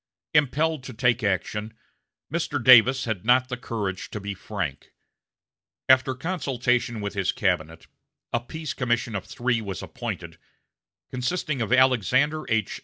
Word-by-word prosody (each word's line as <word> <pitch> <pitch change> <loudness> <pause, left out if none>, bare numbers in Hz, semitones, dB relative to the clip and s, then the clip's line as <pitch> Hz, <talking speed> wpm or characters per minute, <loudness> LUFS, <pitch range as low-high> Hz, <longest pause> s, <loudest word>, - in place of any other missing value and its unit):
Impelled 150 +1 +2
to 130 - -7
take 120 0 +1
action, 105 +3 -2 0.6
Mr. 165 -3 -1
Davis 130 +2 +7
had 110 -6 -3
not 125 +2 +3
the 125 - -2
courage 105 -6 -4
to 105 - -5
be 100 0 -5
frank. 90 -8 -5 0.9
After 130 0 +4
consultation 125 - -1
with 100 0 -4
his 95 -2 0
cabinet, 80 -5 -1 0.5
a 120 - +2
peace 155 +6 -6
commission 120 -2 -1
of 100 - -4
three 120 -2 -1
was 100 -4 -6
appointed, - - -6 0.7
consisting 135 +1 -2
of 115 - -2
Alexander 130 +4 +3
H. 110 -3 0
120 Hz, 135 wpm, -25 LUFS, 105-130 Hz, 0.9 s, Davis